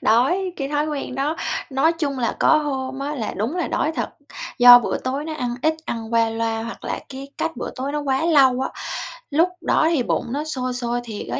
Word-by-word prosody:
đói. 345 - +2
Cái 275 -1 -3
thói 295 +1 0
quen 285 -4 -4
đó, 285 +4 -1 0.3
nói 275 +5 +3
chung 290 -5 -2
là 235 - -1
có 315 - +5
hôm 265 -3 -3
á 290 +2 -3
là 225 -6 -3
đúng 235 - -2
là 350 - -1
đói 315 - 0
thật, - - -1 0.5
do 245 0 +11
bữa 240 - -2
tối 270 +3 -3
nó 315 -1 -4
ăn 245 -5 -2
ít, 315 +1 +3
ăn 230 -3 -5
qua 230 -1 +3
loa 225 0 -2
hoặc 230 - -8
là - - -2
cái 275 +1 -8
cách 325 -5 -2
bữa - - -4
tối 270 +3 -3
nó 295 - -1
quá 275 +2 0
lâu 270 -6 +5
á, 265 - -1 0.6
lúc 330 +5 +3
đó 315 - +2
thì 295 -7 +1
bụng - - -1
nó 295 +2 -1
sôi 255 -5 -3
sôi 240 -1 -2
thiệt 220 -3 -6
á, - - -1
270 Hz, 230 wpm, -22 LUFS, 245-305 Hz, 0.6 s, do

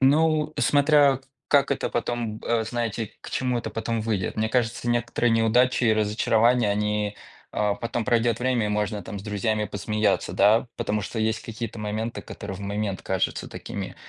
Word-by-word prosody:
Ну, 155 +2 +3
э, - - -1
смотря 145 -2 +4 0.3
как 140 -1 +4
это 140 - -1
потом, 120 -2 -2
э, 115 -1 +1
знаете 115 -2 -3
к - - -9
чему 125 -2 0
это - - -4
потом 115 0 -2
выйдет. 105 -4 -2
Мне 110 0 +1
кажется, 120 0 0
некоторые 120 0 +1
неудачи 120 +3 +3
и 110 - +5
разочарования, 110 +2 +2
они, 105 0 0 0.4
а, 105 -1 +1
потом 115 -1 -3
пройдёт 115 -2 +2
время, 125 -3 +1
и - - -1
можно 105 0 -1
там 105 -3 -6
с - - -9
друзьями 105 +1 -1
посмеяться, 105 +1 0
да? 110 +5 +4
Потому 105 0 -1
что 110 +3 -5
есть 110 0 0
какие-то 115 0 -6
моменты, 110 +2 -3
которые 100 -2 -7
в 95 - -9
момент 100 -1 -3
кажутся 95 -1 -1
такими - - -6
115 Hz, 175 wpm, -25 LUFS, 105-120 Hz, 0.4 s, и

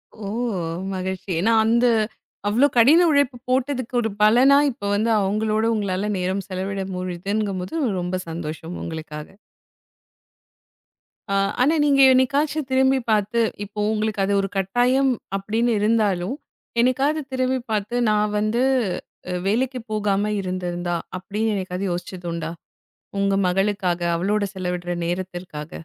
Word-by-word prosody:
ஓ! 215 -2 -7 0.7
மகிழ்ச்சி. 190 +1 -4
ஏன்னா 225 +6 +3
அந்த 235 +2 +3 0.6
அவ்ளோ 240 +7 +4
கடின 305 +10 +7
உழைப்பு 285 -3 +2
போட்டதுக்கு 255 -1 -1
ஒரு 225 - -1
பலனா 250 +6 +6
இப்ப 235 -3 -14
வந்து 220 +3 +1
அவங்களோட 215 +2 0
உங்களால 200 -1 -1
நேரம் 185 +1 -2
செலவிட 190 +1 -3
முடியுதுங்கும்போது 190 - -2 0.2
ரொம்ப 180 +1 -2
சந்தோஷம் 165 +1 -6
உங்களுக்காக. 155 -2 -6 2.1
அ - - +2 0.3
ஆனா 300 +6 +4
நீங்க 280 -2 +4
என்னைக்காச்சு 280 +4 +2
திரும்பிப் 265 -1 +2
பார்த்து 215 +2 +1 0.2
இப்போ 205 +1 -8
உங்களுக்கு 215 -2 -1
அது 200 - 0
ஒரு 195 - -3
கட்டாயம் 245 +7 +2 0.3
அப்படின்னு 225 +4 0
இருந்தாலும் 210 0 +1 0.4
என்னைக்காவது 270 +5 +2
திரும்பிப் 255 -1 -1
பார்த்து 210 +3 -1
நான் 210 0 +1
வந்து 215 +4 0 0.7
அ - - -2
வேலைக்கு 250 +5 0
போகாம 210 -1 0
இருந்திருந்தா? 175 -2 -3 0.2
அப்படின்னு 210 +4 -2
என்னைக்காவது 185 -1 -3
யோசிச்சது 175 0 -5
உண்டா? 165 -1 -4 0.7
உங்க 200 0 +2
மகளுக்காக 185 -1 0 0.2
அவளோட 205 +5 0
செலவிடுற 180 -1 -3
நேரத்திற்காக. 175 -3 -5
210 Hz, 120 wpm, -22 LUFS, 185-245 Hz, 2.1 s, கடின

